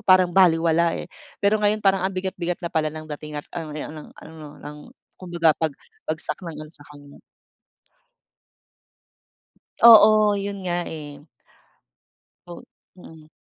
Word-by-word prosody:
parang 185 -2 +4
balewala, 170 -2 +3
eh. - - -6 0.4
Pero 210 +1 +3
ngayon 210 0 0
parang 195 -1 +3
ang 195 - -9
bigat-bigat 185 -2 -4
na 170 - -5
pala 155 -1 0
ng 155 +1 -9
dating 150 0 -9
at 145 - -6
ano 165 -3 -6
ne - - -5
ng 155 -1 -10
ano 155 -2 -12
ng 150 0 -10 0.4
kumbaga 170 -3 +1
pag 160 -2 0 0.4
bagsak 155 +4 -3
ng 165 -3 -8
ano 155 0 -10
sa 145 -3 -16
kanya. 145 -1 -15 2.6
Oo 215 -2 +7
yun 200 0 -5
nga, 175 0 -1
eh. 145 -3 -9 1.2
Oh, 175 - -10 0.3
mm. 160 -3 -15
170 Hz, 140 wpm, -22 LUFS, 155-190 Hz, 2.6 s, Oo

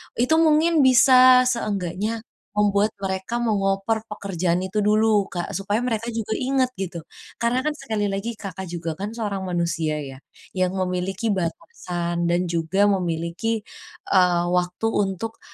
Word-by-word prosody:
Itu 255 +7 +2
mungkin 320 +1 +4
bisa 255 -1 +7
seenggaknya 215 -2 -2 0.3
membuat 205 0 +2
mereka 190 +4 -3
meng-over 210 -1 0
pekerjaan 180 -4 -1
itu 190 +3 -1
dulu, 215 0 +3
Kak, 175 -1 -4
supaya 205 +2 -1
mereka 235 -1 -2
juga 220 -1 -3
inget 260 0 +1
gitu. 185 -3 -5 0.4
Karena 240 +2 +1
kan 305 - 0
sekali 215 -8 -3
lagi, 220 +4 -3
Kakak 190 -2 -7
juga 170 -1 -4
kan 210 +3 -5
seorang 200 -4 -3
manusia 170 -3 -1
ya, 135 -1 -9 0.3
yang 185 0 -1
memiliki 190 +3 -1
batasan 175 - -3
dan 175 0 0
juga 180 +5 +2
memiliki, 180 +4 -2 0.5
eee, 180 -2 +4
waktu 180 +3 -1
untuk 205 +2 -2
200 Hz, 135 wpm, -23 LUFS, 180-225 Hz, 0.5 s, bisa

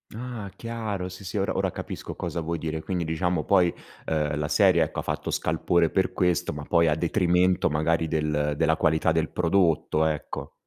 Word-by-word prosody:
Ah, 120 -4 -6
chiaro 110 -5 -4
sì, 90 +2 -11
sì, 90 - -6
ora 95 - 0
ora - - +1
capisco - - -7
cosa - - -4
vuoi 85 +1 -2
dire, 80 0 -3
quindi 90 -1 -2
diciamo 80 0 -1
poi, 90 -3 +3 0.3
ehm, 75 -1 -1
la 75 - -1
serie 90 -1 +4
ecco, 75 - -4
ha - - 0
fatto - - -3
scalpore 85 -2 +1
per 95 -1 0
questo 90 -2 +1
ma 75 - -6
poi 85 +2 +3
a 75 - +3
detrimento 90 +1 +2
del 75 -1 0
della 80 +2 +2
qualità 80 +1 +2
del 80 -1 0
prodotto, 85 -3 +2
ecco. 75 -2 -3
85 Hz, 180 wpm, -26 LUFS, 80-90 Hz, 0.3 s, serie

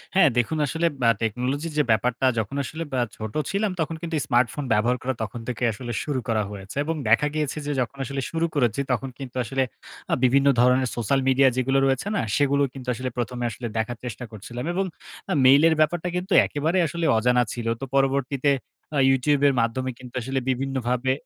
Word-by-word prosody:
হ্যাঁ 180 -6 +6
দেখুন 120 +6 +1
আসলে 160 +4 -1 0.2
অ্যা 115 -1 +5
technology 125 +8 -1
র - - -9
যে 150 - +4
ব্যাপারটা 115 +4 +1
যখন 110 +5 -3
আসলে 160 +4 -5 0.2
আ - - +3
ছোট 110 -1 -6 0.2
ছিলাম, 200 +1 0
তখন 160 0 -1
কিন্তু 170 -1 -3
স্মার্টফোন 125 +3 +1
ব্যবহার 120 +4 +2
করা 130 +1 -1
তখন 110 +3 -6
থেকে 125 -1 -3
আসলে 120 +3 -6
শুরু 145 -4 -2
করা 110 -2 +1
হয়েছে। 100 0 -9
এবং 165 +1 -1
দেখা 115 +7 +4
গিয়েছে 155 -1 -2
যে 145 - -2
যখন 125 +3 -4
আসলে 135 +2 -3
শুরু 165 0 0
করেছি, 125 -2 +1
তখন 130 +2 -1
কিন্তু 130 -3 -8
আসলে 135 +3 0 0.5
আ - - +3
বিভিন্ন 135 +2 +4
ধরনের 125 +1 +4
সোশ্যাল 120 +4 +1
মিডিয়া 135 +1 +5
যেগুলো 135 +1 +2
রয়েছে 135 +7 0
না, - - +1
সেগুলো 140 0 +3
কিন্তু 130 -2 -10
আসলে 130 +2 -4
প্রথমে 120 +1 -3
আসলে 120 +2 -5
দেখার 110 +2 -2
চেষ্টা 125 +1 -5
করছিলাম। 120 +4 -7
এবং 195 +2 0 0.5
আ - - +2
mail 135 +3 +7
এর 160 - +3
ব্যাপারটা 165 +3 +1
কিন্তু 180 +2 -2
একেবারে 155 +5 -1
আসলে 170 +2 -3
অজানা 125 +2 +3
ছিল। 120 -1 -4
তো - - -2
পরবর্তীতে 135 0 +1 0.5
আ - - +1
YouTube 135 +2 +2
এর 140 - +3
মাধ্যমে 130 +3 -1
কিন্তু 125 -1 -11
আসলে 135 +3 -2
বিভিন্নভাবে 130 -1 0
130 Hz, 200 wpm, -24 LUFS, 120-145 Hz, 0.5 s, mail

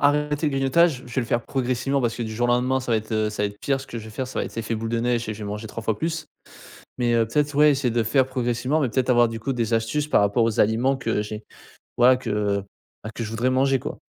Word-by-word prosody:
arrêter 150 +1 +2
le - - +2
grignotage, 135 +1 +2
je 120 - -10
vais 130 - +2
le - - -6
faire 120 - +1
progressivement 135 +1 -1
parce 120 -2 0
que 120 - -4
du 110 -1 -4
jour 120 +2 -1
au - - +4
lendemain 130 +2 +1
ça 125 -2 -2
va - - +4
être, 110 - -10
heu, 110 -1 +1
ça 105 - -3
va 105 - +1
être 105 - -14
pire. 135 -1 0
Ce 135 - -10
que 115 - -6
je 110 - -9
vais 110 - -9
faire 130 +4 -4
ça - - -5
va - - 0
être - - -9
effet 115 0 -2
boule 110 +1 -4
de 115 0 0
neige 120 -1 0
et 110 - -2
je 105 - -9
vais 100 - -5
manger 105 +2 -5
3 115 - -7
fois 110 -1 0
plus. 160 -1 -2 0.7
Mais, 120 -1 +1
heu, 115 -1 +3
peut-être 145 +6 0
ouais, 150 0 +6
essayer 135 -3 0
de 120 - +2
faire 130 +4 +2
progressivement, 125 +3 0
mais 130 - +1
peut-être 130 +2 0
avoir 120 -2 +5
du 115 - -6
coup, 135 +4 -2
des 115 -2 -1
astuces 115 +7 0
par - - +3
rapport 100 +3 +2
aux 115 -2 0
aliments 120 +6 +2
que 115 -4 -1
j'ai 105 +1 -7 0.5
voilà 125 +1 +6
que, 105 -5 -1 0.4
bah, 110 - -5
que - - -4
je 110 - -4
voudrais 115 +3 0
manger 135 +1 +2
quoi. - - -6
120 Hz, 300 wpm, -24 LUFS, 110-135 Hz, 0.7 s, ouais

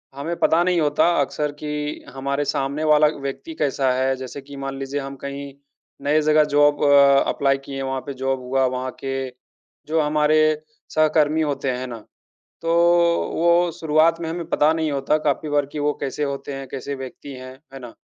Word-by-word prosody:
हमें 160 +5 -3
पता 165 +2 +3
नहीं 180 -2 +2
होता, 145 -1 +2 0.2
अक्सर 145 +2 -2
कि 150 0 -4
हमारे 140 +2 -2
सामने 140 +2 -2
वाला 150 0 +5
व्यक्ति 140 - -5
कैसा 135 -2 +1
है। 130 +1 +1
जैसे 130 +2 -7
कि 140 +1 -12
मान 135 0 -5
लीजिए, 135 +1 -3
हम 135 0 -7
कहीं 140 0 -6 0.5
नए 150 +2 +3
जगह 155 0 +4
जॉब 145 0 +4
अ, 140 -1 +6
अप्लाई 135 -1 +1
किए 140 - -7
हैं, 135 - -3
वहाँ 135 0 -2
पे 140 - -4
जॉब 135 0 -2
हुआ, 130 +1 +1
वहाँ 130 0 -2
के 135 -1 -3 0.6
जो 160 +1 +1
हमारे 150 +1 +2 0.6
सहकर्मी 155 0 +3
होते 140 -3 -1
हैं, 125 - -3
है 130 - -5
ना? 120 -2 -7 0.6
तो 165 - -1 0.6
वो, 170 +1 +3
शुरुआत 160 +1 +3
में 165 - -3
हमें 170 +1 -4
पता 155 -2 +3
नहीं 160 -2 -1
होता 140 +2 +1
काफ़ी 150 +2 0
बार 145 -1 +1
कि 150 - -4
वो 145 0 +1
कैसे 140 +1 -3
होते 140 0 -4
हैं, 135 0 -6
कैसे 140 +1 -5
व्यक्ति 135 +1 -9
हैं, 130 0 -9 0.2
है 135 - -8
ना? 120 -3 -10
140 Hz, 195 wpm, -22 LUFS, 135-150 Hz, 0.6 s, अ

